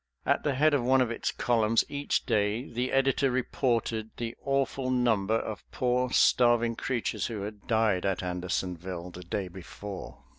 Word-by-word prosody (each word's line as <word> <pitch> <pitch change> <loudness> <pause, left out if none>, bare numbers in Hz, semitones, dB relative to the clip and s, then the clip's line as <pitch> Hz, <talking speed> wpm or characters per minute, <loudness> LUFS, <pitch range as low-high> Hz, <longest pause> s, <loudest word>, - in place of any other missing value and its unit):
At - - +2
the 145 -3 0
head 150 +3 +4
of 140 -4 +2
one 130 +2 +4
of 125 -2 +2
its 115 - -2
columns 115 -2 +2
each 145 0 -1
day 110 +2 0
the 125 +2 -2
editor 135 +1 +2
reported 120 -3 0
the 115 -1 -3
awful 135 -1 0
number 110 -5 +2
of 110 -3 -5
poor 125 0 +1
starving 120 -2 +4
creatures 125 -1 -2
who 110 -4 -5
had 105 0 -8
died 110 -5 +2
at 95 -1 -1
Andersonville 90 0 -3
the 90 - -9
day 95 +2 -3
before. 95 +2 -9
115 Hz, 160 wpm, -29 LUFS, 100-125 Hz, -, head